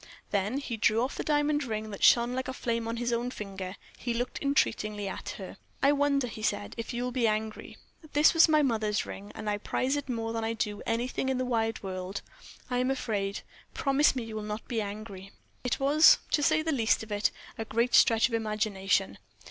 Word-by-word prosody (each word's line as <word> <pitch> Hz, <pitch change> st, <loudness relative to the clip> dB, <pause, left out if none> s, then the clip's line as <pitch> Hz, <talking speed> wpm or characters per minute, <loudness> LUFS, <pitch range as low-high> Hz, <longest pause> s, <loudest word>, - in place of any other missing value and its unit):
Then 205 Hz, +5 st, 0 dB
he 255 Hz, -5 st, -4 dB
drew 220 Hz, +2 st, +3 dB
off 260 Hz, -, -2 dB
the -, -, -3 dB
diamond 295 Hz, 0 st, +1 dB
ring 215 Hz, -3 st, -4 dB
that 200 Hz, -, -6 dB
shone 240 Hz, +1 st, +5 dB
like 260 Hz, 0 st, -2 dB
flame 230 Hz, -2 st, -2 dB
on 230 Hz, +1 st, -3 dB
his 240 Hz, 0 st, -1 dB
own 240 Hz, +1 st, -1 dB
finger; 195 Hz, -5 st, -6 dB, 0.2 s
he 240 Hz, -2 st, -2 dB
looked 245 Hz, +2 st, -3 dB
entreatingly 215 Hz, -7 st, 0 dB
at 190 Hz, -, -5 dB
her. -, -, -8 dB, 0.3 s
"I 280 Hz, -, +6 dB
wonder," 285 Hz, -2 st, +2 dB
he 225 Hz, -2 st, -7 dB
said, 100 Hz, -, -1 dB
"if 230 Hz, -, -5 dB
you 240 Hz, 0 st, -2 dB
will 250 Hz, -, -2 dB
be 240 Hz, -2 st, +1 dB
angry? 215 Hz, 0 st, -3 dB, 0.4 s
This 295 Hz, +2 st, +5 dB
was 330 Hz, -1 st, +6 dB
my 305 Hz, -1 st, +4 dB
mother's 215 Hz, -5 st, 0 dB
ring, 200 Hz, +1 st, -8 dB
and 215 Hz, -, -6 dB
I 205 Hz, 0 st, 0 dB
prize 260 Hz, +6 st, -1 dB
it 285 Hz, -2 st, -4 dB
more 225 Hz, -2 st, -2 dB
than 225 Hz, 0 st, -2 dB
I 225 Hz, +1 st, -1 dB
do 210 Hz, -2 st, -3 dB
anything 245 Hz, +3 st, -1 dB
in 265 Hz, -, 0 dB
the 255 Hz, -, -1 dB
wide 225 Hz, -3 st, -1 dB
world. 185 Hz, +1 st, -5 dB, 0.4 s
I 250 Hz, -1 st, -1 dB
am 255 Hz, +1 st, +1 dB
afraid. 205 Hz, -7 st, -2 dB, 0.3 s
Promise 275 Hz, 0 st, +3 dB
me 250 Hz, -, -2 dB
you 225 Hz, -1 st, -7 dB
will 215 Hz, -, -3 dB
not 210 Hz, +1 st, -5 dB
be 230 Hz, -3 st, -1 dB
angry." 200 Hz, -2 st, -7 dB, 0.3 s
It 250 Hz, -, -1 dB
was, 290 Hz, +3 st, +7 dB
to 300 Hz, -, +3 dB
say 310 Hz, +2 st, +3 dB
the 320 Hz, -, 0 dB
least 225 Hz, -6 st, +2 dB
of 220 Hz, -, -11 dB
it, 205 Hz, 0 st, +2 dB, 0.3 s
a -, -, -1 dB
great 235 Hz, +2 st, 0 dB
stretch 225 Hz, +1 st, +6 dB
of 245 Hz, -, -10 dB
imagination. 215 Hz, -3 st, 0 dB
230 Hz, 215 wpm, -29 LUFS, 215-260 Hz, 0.4 s, was